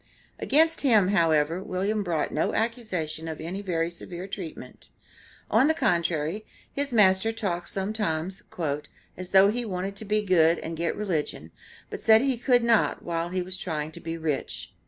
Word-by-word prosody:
Against 320 +4 +3
him, 220 -9 +4
however, 165 -2 +2
William 200 +2 -1
brought 165 -6 -1
no 155 - 0
accusation 190 -9 -2
of 160 -1 -5
any 175 +5 -5
very 170 -3 -1
severe 175 +1 -7
treatment; 190 -4 -8 0.6
on 270 - +5
the 315 - +3
contrary, 170 - 0 0.3
his 280 -1 -1
master 205 -1 +4
talked 185 -6 -3
sometimes 190 -3 -2 0.7
"as 185 0 -6
though 195 +1 +6
he 245 +2 -2
wanted 195 -2 -4
to 220 - -6
be 210 +1 +1
good 170 -4 +4
and 165 - -5
get 170 +1 -1
religion, 180 -8 -3 0.4
but - - -6
said 220 0 +6
he 270 -1 +1
could 245 0 +3
not 230 -2 +2
while 170 0 -2
he 185 0 -2
was 185 +1 -5
trying 155 -3 -3
to 170 - -11
be 165 0 -5
rich." 155 -4 -3
185 Hz, 165 wpm, -26 LUFS, 165-215 Hz, 0.7 s, though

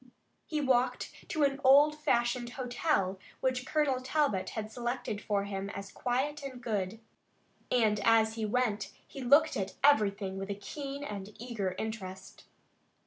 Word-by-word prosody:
He 305 -2 -1
walked 255 -2 +1 0.2
to 310 -3 +1
an 275 0 +1
old 285 +3 +7
fashioned 240 -4 0
hotel 245 - 0 0.2
which 255 -1 -1
Colonel 285 -4 +1
Talbot 260 -7 +1
had 215 0 -4
selected 240 -2 -3
for 205 -2 0
him 200 -1 -4
as 200 0 -7
quiet 270 +4 -1
and 265 -3 -7
good, 215 -3 -2 0.7
and 220 -4 +3
as 220 +1 +4
he 225 -1 -4
went 215 -2 0 0.2
he 275 - -8
looked 285 +5 +5
at 190 -1 -3
everything 200 -8 +3
with 195 +1 -5
a 200 - -2
keen 275 +7 -6
and 205 -5 -6
eager 215 -6 -3
interest. 190 -4 -6
240 Hz, 145 wpm, -31 LUFS, 205-275 Hz, 0.7 s, old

